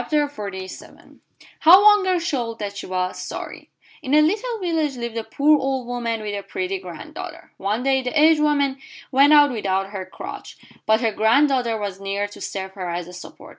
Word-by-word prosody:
HOW 365 +5 +8
ONE 415 -1 +6
GIRL 370 -1 +1
SHOWED 250 -9 -2
THAT 205 -2 -5
SHE - - -6
WAS 185 0 -2
SORRY - - -7 0.3
In 265 +3 0
a 305 - +7
little 440 +8 0
village 320 -7 -1
lived 235 -1 -5
a 225 - -2
poor 295 +5 +3
old 265 -2 -2
woman 235 -2 -3
with 205 -1 -4
a 200 - -3
pretty 375 - -4
granddaughter. - - -9
One 210 +5 -2
day 265 0 +2
the 255 +4 -1
aged 310 0 +5
woman 285 -3 +1 0.3
went 280 +2 +5
out 290 -2 +7
without 195 -4 -2
her 190 -2 -6
crutch, - - -9 0.3
but 220 +1 +3
her 225 -2 +1
granddaughter 235 +2 +2
was 200 -2 -5
near 200 +1 -2
to - - -13
serve 190 -1 -5
her 185 -2 -6
as 175 0 -4
a 180 - -11
support. 180 - -11
245 Hz, 185 wpm, -22 LUFS, 205-300 Hz, 0.3 s, HOW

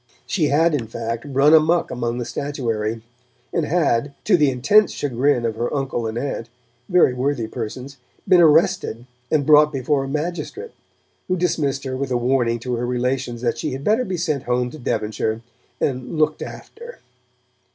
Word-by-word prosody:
She 170 -6 0
had, 160 +3 +3
in 125 -6 -1
fact, 115 +2 -4
run 140 +3 +4
amok 160 +2 +4
among 120 -1 -2
the 120 - -3
statuary, 115 -5 -3 0.5
and 160 -3 0
had, 140 -5 +1
to 205 - +4
the 150 -5 +4
intense 155 +12 +4
chagrin 130 -2 0
of 110 -1 -2
her 120 +1 -2
uncle 135 -5 -2
and 110 +1 -4
aunt, 120 -3 -4 0.4
very 180 -8 +4
worthy 125 -1 -1
persons, 125 +4 -6 0.3
been 180 -2 +6
arrested 160 -6 +3 0.2
and 150 -3 +1
brought 150 0 +6
before 135 +1 0
a - - -6
magistrate, 175 - -4 0.6
who 185 - 0
dismissed 150 -6 0
her 130 -1 -4
with 135 +1 -3
a 125 - +1
warning 120 -1 +1
to 125 -1 -2
her 120 - -2
relations 125 -1 -2
that 120 -1 0
she 150 0 -3
had 135 +1 -6
better 220 +8 +2
be 190 -5 -3
sent 155 -5 -2
home 125 0 0
to 155 - -10
Devonshire 110 -1 -2 0.4
and 130 +3 -2
'looked 155 0 +1
after'. 470 +2 -9
135 Hz, 170 wpm, -21 LUFS, 120-155 Hz, 0.6 s, been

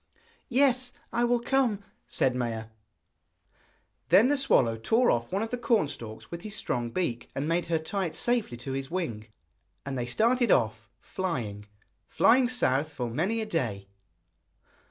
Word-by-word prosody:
'Yes, 255 -1 +3 0.2
I 240 - +2
will 240 0 +2
come,' 235 -5 +1 0.2
said 130 -2 +1
Maia. 115 -3 -3 1.4
Then 200 +9 +6
the 290 - +3
swallow 120 - +3
tore 225 - +2
off 115 0 -1
one 195 +3 0
of 225 - -5
the 245 - -2
corn 230 -8 +2
stalks 110 -5 -8
with 170 0 -6
his 215 +1 -6
strong 120 - -2
beak, 120 -6 -2
and 140 +2 -2
bade 170 +1 0
her 165 -1 +1
tie 185 +5 -2
it 160 - -8
safely 235 - 0
to 125 +3 -6
his 135 0 -3
wing. 120 -13 -3 0.6
And 140 -1 -4
they 120 -1 -2
started 235 - +2
off, 110 -2 +1
flying, 115 - -4 0.4
flying 245 +1 +4
south 155 - +1
for 125 -5 -4
many 190 - 0
a - - -2
day. 110 - -3
165 Hz, 160 wpm, -28 LUFS, -, 1.4 s, Then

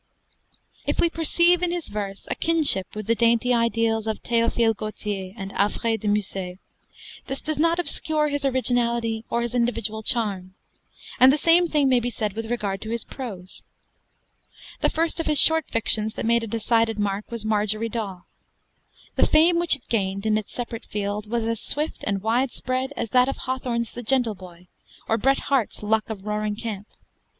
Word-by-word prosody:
If - - -1
we 340 - +3
perceive 340 +2 +3
in 360 - +1
his 345 -1 -3
verse 200 -2 -5
a - - +5
kinship 310 - +2
with 215 -1 -5
the 230 - +2
dainty 235 +1 +2
ideals 230 -1 +1
of 220 - -3
Théophile 230 -1 +1
Gautier 205 -3 -5
and 195 -1 -6
Alfred 225 +2 0
de 210 - -3
Musset, 195 -3 -1 0.7
this 270 - -3
does 310 -2 -3
not 335 +2 +3
obscure 310 -3 0
his 285 0 -2
originality 235 -4 +1
or 235 0 0
his 240 0 -3
individual 230 -3 -1
charm; 195 -5 -1 0.6
and 255 +1 +8
the 290 - +1
same 340 +3 +5
thing 295 -4 +2
may 255 -2 +4
be 240 +1 -2
said 215 -3 -3
with 225 +1 -5
regard 205 -5 -2
to 220 - -7
his 230 0 -2
prose. 195 -9 -8 1.2
The - - +2
first 330 +1 -1
of 330 - -2
his 300 -2 +5
short 320 -2 +5
fictions 220 -1 +3
that - - -4
made 235 +1 +3
a - - -4
decided 225 0 +1
mark 205 0 -2
was 230 -2 -4
'Marjorie 215 +1 0
Daw.' 200 -6 -5 0.9
The - - +4
fame 335 +2 +4
which 345 -3 +5
it 280 - -12
gained, 195 -2 -1
in 215 -1 +2
its 215 -1 -3
separate 235 -1 -6
field, 205 0 -4
was 230 -1 -1
as 230 -1 -2
swift 300 +2 -3
and 200 -2 -1
widespread 255 +3 -1
as 225 - -3
that 250 +1 +4
of 275 - -4
Hawthorne's 245 -3 -2
'The 240 - -7
Gentle 245 -1 +1
Boy' 180 -2 -14 0.4
or 225 - +1
Bret 270 +4 +2
Harte's 260 -7 -1
'Luck 215 +1 0
of 205 -3 -7
Roaring 210 0 -2
Camp.' 210 -2 -6
230 Hz, 180 wpm, -24 LUFS, 210-260 Hz, 1.2 s, and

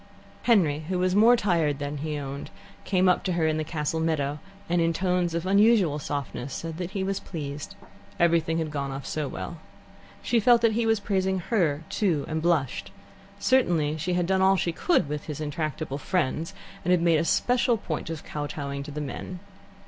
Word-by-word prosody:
Henry, 175 -11 +3
who 185 - 0
was 180 0 +1
more 225 +4 +7
tired 170 -10 +1
than 145 0 -4
he 150 +1 -3
owned, 140 0 -6 0.4
came 185 -1 +2
up 180 - +3
to 185 - -1
her 170 -2 +1
in 155 0 +1
the 155 - -1
castle 155 0 -2
meadow, 150 -3 0 0.3
and, 175 0 +2
in 165 0 +2
tones 180 -1 0
of 170 +1 -2
unusual 200 -5 +4
softness, 140 -2 -4
said 165 -1 -5
that 180 -1 -4
he 190 - 0
was 195 0 -1
pleased. 145 -4 -6 0.4
Everything 165 -1 +3
had 160 -2 -2
gone 140 -2 -3
off 135 +1 -6
so 155 -2 -2
well. 170 +4 -6 0.6
She 235 - +2
felt 235 +2 +5
that 230 - +5
he 225 +1 0
was 225 -1 +3
praising 190 -2 0
her, 170 -6 0
too, 170 -10 0
and 160 0 -2
blushed; 140 - 0 0.5
certainly 175 - +2
she 170 +4 -2
had 175 -1 +1
done 190 +1 +1
all 190 0 +5
she 175 - 0
could 165 - +1
with 150 +1 -4
his 150 -2 -5
intractable 150 -2 -3
friends, 165 -2 -1 0.3
and 180 - -2
had 180 -2 +4
made 165 -2 +4
a - - +1
special 245 +6 +2
point 160 -6 -4
of 160 -2 -5
kowtowing 145 -1 -4
to 140 - -8
the 150 +1 -4
men. 175 +5 -6
165 Hz, 195 wpm, -26 LUFS, 150-190 Hz, 0.6 s, more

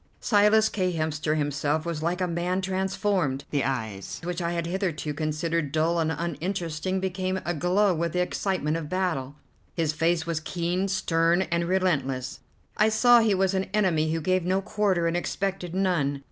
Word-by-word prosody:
Silas 215 0 +4
K. 185 -4 -1
Hemster 155 -1 -1
himself 145 +1 -1
was 165 -3 -3
like 175 +3 -1
a 180 - +1
man 175 +2 -1
transformed; 190 -6 -1
the 145 -2 +1
eyes 110 -7 -3
which 175 +1 -3
I 170 0 -1
had 170 -1 -2
hitherto 170 -4 -2
considered 155 0 -1
dull 160 +2 +1
and 160 -1 +1
uninteresting 170 +2 -2
became 185 0 -2
aglow 180 +4 +2
with 170 0 -2
the 180 - 0
excitement 180 -4 -1
of 155 -3 -6
battle. 165 -7 -1 0.4
His 160 -3 0
face 165 +1 +1
was 165 -2 -1
keen, 175 +4 -2
stern, 175 -2 +2
and 170 0 -1
relentless; 145 -8 0 0.4
I 215 +1 +4
saw 240 +2 +6
he 220 -3 +3
was 190 0 +1
an 190 0 -1
enemy 165 -7 +2
who 165 0 -1
gave 185 +2 +1
no 185 +2 +1
quarter 195 -3 0
and 165 0 +1
expected 185 0 -2
none. 170 -8 +1
170 Hz, 170 wpm, -26 LUFS, 155-190 Hz, 0.4 s, saw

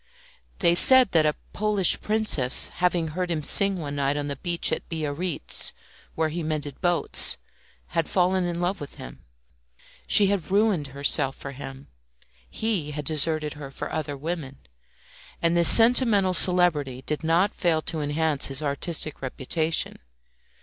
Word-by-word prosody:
They 170 -3 +2
said 255 +5 +7
that 160 -2 +3
a 150 - -1 0.2
Polish 210 -3 0
princess 210 - +1
having 175 -2 -1
heard 180 +3 -4
him 160 -3 -3
sing 195 +5 +5
one 145 -4 -6
night 140 +1 -1
on 145 0 -4
the 140 - -4
beach 170 +4 -2
at - - -4
Biarritz, 160 +1 -2 0.4
where 160 -1 -1
he 170 +3 -5
mended 150 -3 -5
boats, 175 -2 +2 0.5
had 165 - -2
fallen 185 0 +1
in 175 -1 -4
love 180 +1 -2
with 145 - -9
him. - - -12 0.8
She 205 - +5
had 195 -3 -2
ruined 200 -6 +1
herself 135 0 +2
for 140 - -9
him. 135 0 -10 0.6
He 205 -9 -3
had 150 -1 -6
deserted 155 0 -1
her 145 -2 -10
for 135 - -7
other 145 -2 -4
women, 150 -3 -6 0.8
and 170 0 0
this 170 -1 +7
sentimental 225 -5 +5
celebrity 160 -8 +1
did 150 0 -4
not 170 +5 +1
fail 160 -3 -1
to 160 -2 -4
enhance 150 0 -1
his 135 +2 -4
artistic 150 +1 -2
reputation. 155 +5 -2
160 Hz, 150 wpm, -24 LUFS, 145-180 Hz, 0.8 s, said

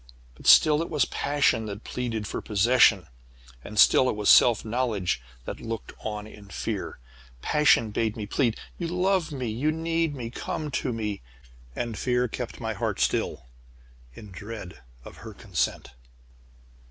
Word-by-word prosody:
But 60 - -10
still 150 0 +7
it 165 - -4
was 150 -7 +2
passion 140 -6 0
that 105 +1 -7
pleaded 115 -4 -4
for - - -4
possession, 110 -2 +4 0.6
and 105 - -9
still 130 +4 +6
it - - -1
was 105 -1 +4
self 115 -3 +6
knowledge 110 - -1 0.2
that - - -6
looked 115 -1 -5
on 105 -1 -5
in 105 -2 -13
fear. 95 - -4 0.5
"Passion 150 -7 +3
bade 110 +1 -1
me 105 - -4
plead: 115 +2 0 0.2
'You 170 - -2
love 180 0 0
me! 130 -3 -4
You 125 +8 0
need 165 -1 -1
me! 120 -3 -6
Come 155 +3 -4
to 130 0 -1
me!' 105 -3 -3 0.5
And 120 -2 -3
fear 125 -1 +1
kept - - -6
my - - -3
heart - - -3
still, - - 0 0.7
in 105 - -11
dread 100 - -9 0.2
of - - -11
her - - -10
consent. - - -2
115 Hz, 155 wpm, -26 LUFS, 105-145 Hz, 0.7 s, still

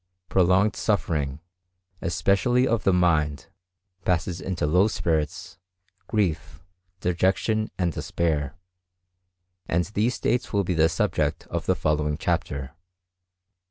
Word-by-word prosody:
Prolonged 95 +3 +3
suffering, 75 -9 -1 0.6
especially 100 +9 +2
of 115 -3 0
the 95 - +5
mind, 80 -6 +1 0.5
passes 90 -1 0
into 90 -4 -2
low 90 +7 +4
spirits, 80 -8 -2 0.5
grief, 95 -4 -1 0.4
dejection, 95 +5 +1
and 90 -3 0
despair, 75 -4 -1 1.1
and 85 +1 +1
these 115 +4 +1
states 125 - -1
will 100 -2 +2
be 90 - -1
the 80 -1 +4
subject 85 - 0
of - - -3
the - - +3
following 75 -1 0
chapter. 70 -1 -2
90 Hz, 110 wpm, -25 LUFS, 75-100 Hz, 1.1 s, the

